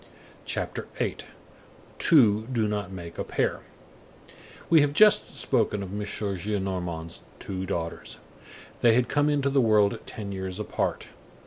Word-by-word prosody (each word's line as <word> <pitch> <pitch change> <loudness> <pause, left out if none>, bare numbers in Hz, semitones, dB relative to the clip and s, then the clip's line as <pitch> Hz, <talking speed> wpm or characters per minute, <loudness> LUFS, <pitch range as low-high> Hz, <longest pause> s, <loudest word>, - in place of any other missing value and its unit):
CHAPTER - - -4
VIII—TWO 110 -8 0
DO 115 -4 +1
NOT 105 -3 -3
MAKE 85 -3 -8
A - - 0
PAIR - - -1 1.1
We 160 -2 +6
have 145 0 +1
just 210 +6 +5
spoken 110 -5 +1
of 95 - -7
M. 105 - -3
Gillenormand's 95 -5 -3 0.2
two 95 -1 -5
daughters. 85 -3 -4 0.6
They 115 -2 +5
had 125 0 +2
come 145 +3 +2
into 140 -2 +1
the 135 -1 +3
world 105 -3 +3
ten 100 -2 -6
years 95 0 -5
apart. 105 - -2
105 Hz, 130 wpm, -26 LUFS, 95-125 Hz, 1.1 s, We